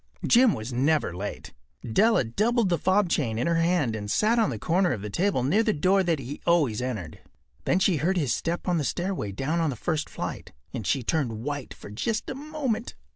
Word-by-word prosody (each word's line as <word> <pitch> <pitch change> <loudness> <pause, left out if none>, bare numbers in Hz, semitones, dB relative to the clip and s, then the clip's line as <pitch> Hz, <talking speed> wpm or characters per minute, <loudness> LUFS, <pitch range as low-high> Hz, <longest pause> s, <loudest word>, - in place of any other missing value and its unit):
Jim 245 -3 +5
was 110 +4 -6
never 140 - +1
late. 100 +3 -6 0.3
Della 215 - +3
doubled 215 - +1
the 170 - +1
fob 190 +1 +2
chain 120 -9 0
in 120 - 0
her 170 0 +2
hand 165 -8 +1
and 105 -1 -5
sat 220 - +2
on 225 - +3
the 120 - -3
corner 175 - +1
of 105 -5 -5
the 105 - -5
table 180 - +1
near 160 - +3
the 220 -2 +1
door 190 +6 +3
that 170 -3 +1
he 135 +2 -7
always 145 -11 +2
entered. 110 -11 -4 0.5
Then - - +2
she 190 -3 +2
heard 180 +6 0
his 145 -8 +1
step 170 +3 -3
on 175 -2 +2
the - - -1
stair 175 +7 -1
away 105 - -3
down 140 - -1
on 165 -2 +1
the 135 - -3
first 155 +5 -2
flight, - - -6 0.2
and 115 -7 -4
she 135 - +1
turned 115 -6 -1
white 145 -1 -4
for - - -11
just 215 - -2
a - - -2
moment. 275 -5 -3
160 Hz, 225 wpm, -26 LUFS, 120-195 Hz, 0.5 s, Jim